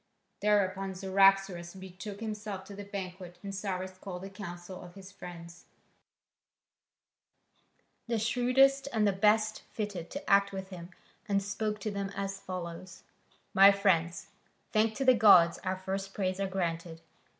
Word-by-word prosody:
Thereupon 195 -2 +1
Cyaxares 195 -2 +3
betook 190 +2 -9
himself 210 -3 -5
to 200 +1 -10
the 205 - -7
banquet 185 -3 -7
and 200 -1 -5
Cyrus 185 -1 -4
called 185 -2 -7
a 195 - -8
council 180 -1 -8
of 175 -1 -12
his 195 0 -11
friends, 175 -2 -11 2.4
the 230 -1 0
shrewdest 255 +5 +3
and 215 -2 +3
the - - +4
best 215 +2 +2
fitted 205 -6 -4
to 285 +1 -7
act 200 0 +4
with 190 -1 -6
him, 175 -1 -8 0.4
and 200 -1 +3
spoke 210 +1 -2
to 215 - -2
them 200 -1 -3
as 195 0 -3
follows: 180 -1 -7 0.5
"My 195 +1 +9
friends, 180 -4 +1 0.4
thanks 220 0 +2
to 270 - -1
the 255 - +8
gods, 190 -7 +6
our 185 0 -2
first 195 +1 -4
prayers 185 -1 -1
are 195 - 0
granted. 170 -3 -3
195 Hz, 145 wpm, -30 LUFS, 185-205 Hz, 2.4 s, My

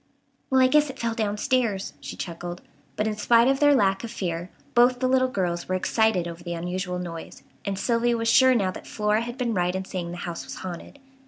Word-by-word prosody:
"Well, 265 - +4
I 260 - +6
guess 300 +2 +3
it 265 - -8
fell 230 -2 -1
downstairs," 215 -1 0
she - - -7
chuckled; 175 0 -6 0.3
but 210 - 0
in 215 -1 -1
spite 230 +3 +4
of 270 0 +2
their 290 -1 +5
lack 195 -4 +2
of 235 - -5
fear 175 -5 -4 0.2
both 245 +1 +5
the 255 - +1
little 255 0 +3
girls 180 -7 -2
were 185 - +1
excited 190 -2 +1
over 170 0 -8
the 175 0 -4
unusual 180 +2 -3
noise, 170 -2 -7 0.2
and 200 -1 -2
Sylvia 235 +2 +1
was 230 0 -2
sure 260 +2 +6
now 195 -5 +1
that - - -10
Flora 210 0 +1
had 240 +2 -6
been 245 -3 -1
right 180 -1 0
in 190 0 -3
saying 180 -2 -4
the 175 - -6
house 175 -1 -5
was - - -8
haunted. 180 +9 -7
210 Hz, 225 wpm, -25 LUFS, 180-240 Hz, 0.3 s, I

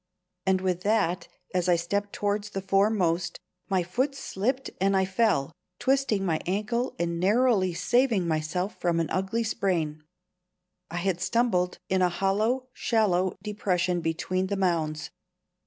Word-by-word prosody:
And 190 -1 +3
with 185 -1 0
that, 190 -4 +1 0.3
as 180 0 +1
I 175 - +6
stepped 200 +4 -1
towards 205 0 -1
the 195 -1 -4
foremost, 190 -3 +1 0.3
my 190 -2 +2
foot 255 +11 -1
slipped 260 +1 -2
and 195 0 +3
I 190 - +3
fell, 190 -7 +1 0.3
twisting 265 -7 +1
my 160 -3 +1
ankle 215 +6 -1
and 170 0 -1
narrowly 200 -2 +3
saving 235 -4 +2
myself 165 +5 -1
from 170 -1 +1
an 165 - -1
ugly 190 +5 0
sprain. 165 -8 -1 0.9
I 170 - -5
had 175 0 -1
stumbled 190 -5 +1
in 190 0 +1
a 180 - +4
hollow, 215 +8 0
shallow 190 -5 +1
depression 185 -4 0
between 185 +3 -1
the 200 +1 -2
mounds. 160 -5 0
190 Hz, 140 wpm, -27 LUFS, 175-210 Hz, 0.9 s, I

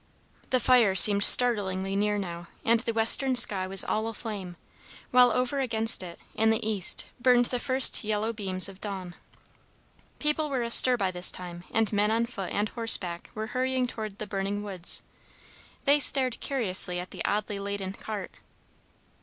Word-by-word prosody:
The 255 - 0
fire 240 -7 +2
seemed 200 +1 +6
startlingly 195 -6 +4
near 210 +1 -1
now, 175 -3 -8 0.2
and 230 0 +1
the 230 - -4
western 230 +4 +1
sky 195 -6 +3
was 195 +1 +1
all 220 +1 -3
aflame, 205 -6 -8 0.5
while 250 0 +4
over 250 +4 -2
against 225 -4 0
it, 175 -2 -11
in 220 +1 0
the 220 -1 -2
east, 205 -4 -2
burned 245 -1 +2
the 250 0 -4
first 260 -1 +7
yellow 215 +1 -3
beams 190 -4 0
of 195 0 -15
dawn. 190 -4 -7 1.0
People 300 0 -2
were 260 -3 -3
astir 245 +2 +4
by 195 -4 -3
this 180 0 -1
time, 175 -1 -11
and 220 -1 -2
men 205 +1 0
on 225 +1 -1
foot 200 -6 -8
and 205 +1 -3
horseback 195 -7 +1
were 215 0 -5
hurrying 255 0 -2
toward 215 -4 -8
the 215 - -7
burning 200 +1 -5
woods. 190 -4 -3 0.8
They 285 +1 +2
stared 260 -3 +2
curiously 190 -9 +3
at 180 - -10
the - - -8
oddly 205 -1 -4
laden 200 -1 -6
cart. 205 -2 -8
215 Hz, 165 wpm, -25 LUFS, 195-240 Hz, 1.0 s, first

